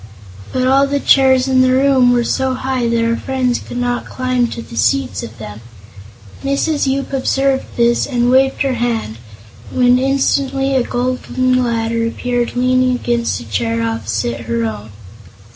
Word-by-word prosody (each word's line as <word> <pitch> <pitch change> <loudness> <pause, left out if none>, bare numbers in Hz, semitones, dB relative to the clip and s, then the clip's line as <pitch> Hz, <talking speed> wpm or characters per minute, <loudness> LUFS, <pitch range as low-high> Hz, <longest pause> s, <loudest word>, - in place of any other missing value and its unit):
But 255 0 0
all 275 +1 +4
the 285 0 -1
chairs 265 -2 +4
in 260 -1 +3
the 255 0 +3
room 260 -2 +4
were 240 -1 +2
so 260 +2 -1
high 255 -2 -2
that 230 0 +1
our 230 0 +1
friends 255 -1 -1
could - - -8
not 245 0 -2
climb 255 -1 0
to 235 0 -7
the - - -12
seats 115 -2 0
of 115 +1 -9
them. 105 0 -9 0.8
Mrs. 275 +2 0
Yoop 275 +1 -2
observed 270 0 0
this 235 0 +2
and 245 -2 +1
waved 265 +2 +3
her 270 -1 0
hand, 230 - -2 0.5
when 250 0 +3
instantly 270 0 0
a 260 - +3
golden 255 +1 -1
ladder 230 -1 -1
appeared 245 +1 -2
leaning 255 0 +2
against 235 - -1
a - - -10
chair 115 +2 -1
opposite 115 +1 -2
her 115 0 -1
own. 110 -1 -6
245 Hz, 160 wpm, -16 LUFS, 230-265 Hz, 0.8 s, all